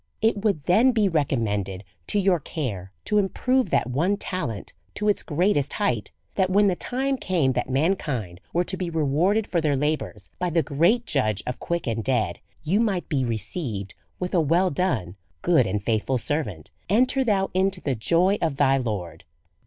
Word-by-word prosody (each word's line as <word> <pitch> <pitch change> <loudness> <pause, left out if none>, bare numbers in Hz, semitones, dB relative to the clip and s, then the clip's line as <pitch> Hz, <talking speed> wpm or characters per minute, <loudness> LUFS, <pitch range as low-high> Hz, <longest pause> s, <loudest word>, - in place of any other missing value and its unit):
It 220 -2 +1
would 200 -10 +1
then 225 - +4
be 215 -3 +3
recommended 105 - -1 0.2
to - - 0
your 190 -3 +3
care 105 - -5
to 210 - +3
im 195 -1 +1
prove 255 +4 +1
that - - +1
one 175 +10 +1
talent 165 - -4 0.2
to 210 - -1
its 205 - +3
greatest 155 -2 +1
height; 115 -5 -1 0.2
that 185 - +1
when 205 +2 +4
the 190 -3 +3
time 265 +6 -1
came 175 - +1
that 130 - -2
mankind 130 - -1
were 175 - +2
to 185 - -5
be 180 -2 -3
rewarded 165 +7 +1
for 170 -4 0
their 150 -2 +1
labours 150 +3 -2
by 180 0 0
the 165 -1 +2
great 175 - +2
Judge 110 - 0
of 125 - -4
quick 170 -1 -2
and 115 -2 -2
dead, 120 -4 0 0.2
you 180 +7 +2
might 200 -6 0
be 140 -5 +1
received 110 - -3 0.3
wrth 180 0 -3
a 175 - +4
well 170 +5 +2
done, 130 - -1 0.3
good 160 - +4
and 100 +1 -2
faithful 115 +4 0
servaiit, 110 - -3 0.2
enter 255 +6 +3
thou 200 -5 +1
into 190 0 +1
the 140 -6 -1
joy 175 - +2
of 160 -4 0
thy 135 -1 +3
Lord. 100 -10 -4
160 Hz, 185 wpm, -25 LUFS, 125-190 Hz, 0.3 s, then